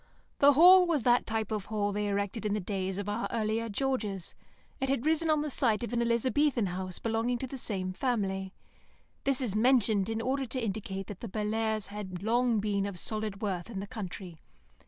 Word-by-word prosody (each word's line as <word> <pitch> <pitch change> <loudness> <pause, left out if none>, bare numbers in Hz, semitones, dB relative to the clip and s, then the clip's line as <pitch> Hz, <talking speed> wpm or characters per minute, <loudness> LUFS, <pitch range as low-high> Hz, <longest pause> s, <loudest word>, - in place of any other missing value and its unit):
The 285 +1 +7
Hall 360 +5 +8
was 310 -8 +1
that 245 +1 +3
type 220 -1 -2
of 210 -3 -2
hall 210 -2 -1
they 205 +1 -1
erected 200 +2 -2
in 210 -1 0
the - - 0
days 190 -1 -3
of 200 0 -4
our 210 +3 -1
earlier 225 0 -1
Georges; 210 -5 -2 0.5
it 270 -1 -1
had 275 -1 0
risen 320 +1 +2
on 305 -1 +3
the 300 - -3
site 235 -4 +2
of 235 - -4
an 235 - +1
Elizabethan 235 +1 +2
house 185 0 -4
belonging 230 +2 0
to 260 - -4
the 260 - -7
same 185 -5 -2
family. 195 -5 -1 0.7
This 275 -1 +1
is 225 -6 -2
mentioned 220 -4 +3
in 225 0 -1
order 265 +3 -1
to 255 - -2
indicate 195 -3 -3
that 200 -1 -8
the 230 - -6
Bellairs' 215 +1 -1
had 195 -3 -6
long 235 0 +2
been 200 -1 0
of 200 -3 -6
solid 215 +1 -3
worth 190 -1 -2
in 205 -5 -5
the 195 - -4
country. 190 -6 -7
220 Hz, 200 wpm, -30 LUFS, 200-245 Hz, 0.7 s, Hall